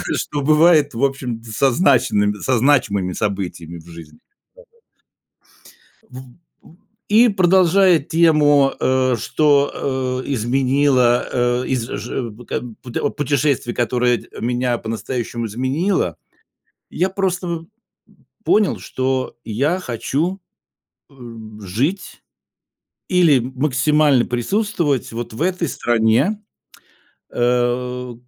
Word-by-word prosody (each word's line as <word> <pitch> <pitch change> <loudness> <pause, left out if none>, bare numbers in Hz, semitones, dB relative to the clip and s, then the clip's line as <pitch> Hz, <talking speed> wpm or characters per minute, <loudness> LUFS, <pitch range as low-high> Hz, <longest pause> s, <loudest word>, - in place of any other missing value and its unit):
Что 145 -1 -3
бывает, 155 -1 +4
в 120 +4 -3
общем-то, 125 -4 -3
со 135 +4 +2
значинымы 120 - +2
со 130 -2 +1
значимыми 110 -8 +1
событиями 90 -5 -4
в 80 - -17
жизни. 85 -2 -13
Да-да-да. 415 - -53 1.7
В 130 - -10
в 130 +1 -15 0.7
и 225 +4 +5
продолжая 185 -2 +4
тему, 145 -3 +3
э, 130 -1 +1
что, 130 -1 0
э, - - -4
изменило, 130 +1 +2 0.3
э, - - -5
из 125 -3 -2
ж 120 -3 -5
п 115 +3 -14
как - - -4
бы 120 -3 -10
п 125 -2 -5
о 145 - 0
путешествий, 140 -3 -1
которое 120 0 +1
д - - -15
меня 120 +1 -1
по-настоящему 115 +1 -4
изменило, 130 - -1 0.7
я 185 +3 -1
просто 180 -3 -2 0.8
понял, 210 -3 +2
что 130 -1 -3
я 140 - 0
хочу, 165 - -3 0.7
эм, 115 -4 -11
жить 130 - -3 0.9
или, 175 -7 +4
м 125 +2 -5
максимально 145 -1 +2
присутствовать 150 - -1
вот 115 -1 -6
в 150 - -4
этой 180 -3 -1
стране, 120 - +1 0.9
э. 125 +1 -1
130 Hz, 110 wpm, -19 LUFS, 120-155 Hz, 1.7 s, и